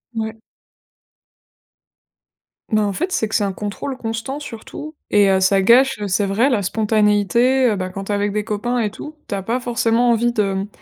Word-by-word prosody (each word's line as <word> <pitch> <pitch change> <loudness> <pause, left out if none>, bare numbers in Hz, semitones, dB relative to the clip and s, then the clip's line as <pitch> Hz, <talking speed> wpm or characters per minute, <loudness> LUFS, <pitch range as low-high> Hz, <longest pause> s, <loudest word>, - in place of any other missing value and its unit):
Ouais. 220 0 -4 2.3
Ben, 215 -1 +3
en 200 - -1
fait, 355 - -2
c'est 220 -11 0
que 220 - -10
c'est 210 - +2
un 200 - 0
contrôle 210 +7 -5
constant 225 +4 -4
surtout 290 +3 -8 0.2
et 205 -1 +4
heu, 190 - +3
ça 195 +1 +3
gâche, 255 +6 +5
heu, 205 - -3
c'est 200 +1 +1
vrai, 230 +8 +2
la 215 -5 +1
spontanéité, 215 +5 +2
heu, - - 0
bah 185 -1 -3
quand 195 +1 -6
tu 210 - -4
es - - +1
avec 205 0 0
des 210 0 -1
copains 235 +3 -2
et 215 -3 0
tout, 300 +8 -9
tu - - -5
as 195 - -2
pas 230 +6 -1
forcément 240 0 +1
envie 240 +1 +2
de, 200 -3 0
mmh, 195 +1 -3
220 Hz, 205 wpm, -20 LUFS, 205-240 Hz, 2.3 s, gâche